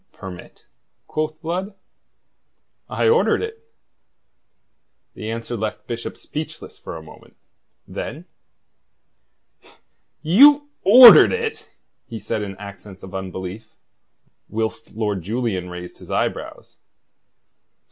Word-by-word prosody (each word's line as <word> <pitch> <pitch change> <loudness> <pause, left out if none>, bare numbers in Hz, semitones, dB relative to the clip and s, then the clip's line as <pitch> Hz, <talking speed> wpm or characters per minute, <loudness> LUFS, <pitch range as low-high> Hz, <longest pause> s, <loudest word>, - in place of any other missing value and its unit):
"Permit?" 95 -3 -11 0.4
quoth 155 0 -3
Blood. 185 +5 -3 1.1
"I - - 0
ordered 460 0 +3
it." 450 0 -7 1.5
The 110 - -7
answer 115 +1 -4
left 110 -1 -4
Bishop 115 -1 -6
speechless 155 +1 -8
for - - -8
a 80 - -11
moment. 80 - -16 0.5
Then: - - -7 2.0
"You 285 - +6
ordered 240 +4 +10
it?" 460 -1 -4 0.4
he 115 -4 -7
said 105 0 -3
in 100 -2 -6
accents 100 -1 -11
of 95 0 -10
unbelief, 95 +2 -7 0.7
whilst 110 0 -4
Lord 105 -3 -2
Julian 100 -2 -3
raised 90 0 -9
his - - -14
eyebrows. - - -4
115 Hz, 100 wpm, -21 LUFS, -, 2.0 s, ordered